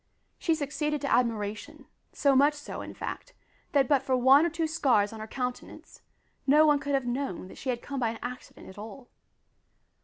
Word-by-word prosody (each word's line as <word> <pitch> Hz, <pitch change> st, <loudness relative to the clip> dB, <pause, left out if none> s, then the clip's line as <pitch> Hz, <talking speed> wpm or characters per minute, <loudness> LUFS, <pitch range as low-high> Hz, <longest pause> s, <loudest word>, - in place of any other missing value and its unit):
She 330 Hz, -, +1 dB
succeeded 300 Hz, 0 st, -2 dB
to 280 Hz, -, 0 dB
admiration, 220 Hz, -4 st, -1 dB, 0.3 s
so 280 Hz, -2 st, +2 dB
much 290 Hz, +3 st, +5 dB
so, 290 Hz, -, -7 dB
in -, -, -8 dB
fact, -, -, -7 dB, 0.4 s
that 275 Hz, -3 st, +4 dB
but 280 Hz, -2 st, +3 dB
for 265 Hz, -1 st, 0 dB
one 270 Hz, +6 st, +6 dB
or -, -, -1 dB
two 330 Hz, 0 st, -2 dB
scars 260 Hz, -10 st, +2 dB
on 220 Hz, -, -8 dB
her 215 Hz, -, -6 dB
countenance, 250 Hz, +1 st, -6 dB, 0.5 s
no 300 Hz, +3 st, +6 dB
one 295 Hz, -2 st, +4 dB
could 280 Hz, 0 st, -1 dB
have 270 Hz, -2 st, 0 dB
known 245 Hz, -7 st, -3 dB
that -, -, -12 dB
she 265 Hz, -, -4 dB
had 240 Hz, -1 st, -2 dB
come 275 Hz, -1 st, -4 dB
by 235 Hz, -3 st, +1 dB
an 225 Hz, -, -6 dB
accident 250 Hz, +1 st, -8 dB
at 190 Hz, -, -11 dB
all. 225 Hz, +4 st, -10 dB
270 Hz, 195 wpm, -28 LUFS, 240-290 Hz, 0.5 s, one